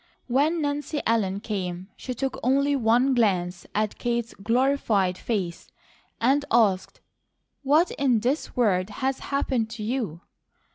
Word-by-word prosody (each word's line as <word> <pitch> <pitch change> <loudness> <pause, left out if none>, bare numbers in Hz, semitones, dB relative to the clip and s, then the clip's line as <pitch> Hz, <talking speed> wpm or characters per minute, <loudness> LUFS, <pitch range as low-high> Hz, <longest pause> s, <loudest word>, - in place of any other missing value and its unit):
When 300 +6 +1
Nancy 290 +1 -2
Ellen 200 -4 +1
came, 185 -4 -4
she 255 - -6
took 270 +2 -3
only 280 +3 +2
one 245 +2 +3
glance 180 -7 0
at 215 0 -1
Kate's 235 -1 -1
glorified 225 -4 +1
face 185 -4 -3 0.5
and 270 +5 +3
asked: 205 -5 +2 0.6
"What 300 +5 +3
in 250 -6 +1
this 265 +7 -1
world 195 -6 +2 0.2
has 265 0 0
happened 260 -5 -1
to 225 -1 -6
you?" 215 - -3
235 Hz, 130 wpm, -25 LUFS, 200-270 Hz, 0.6 s, one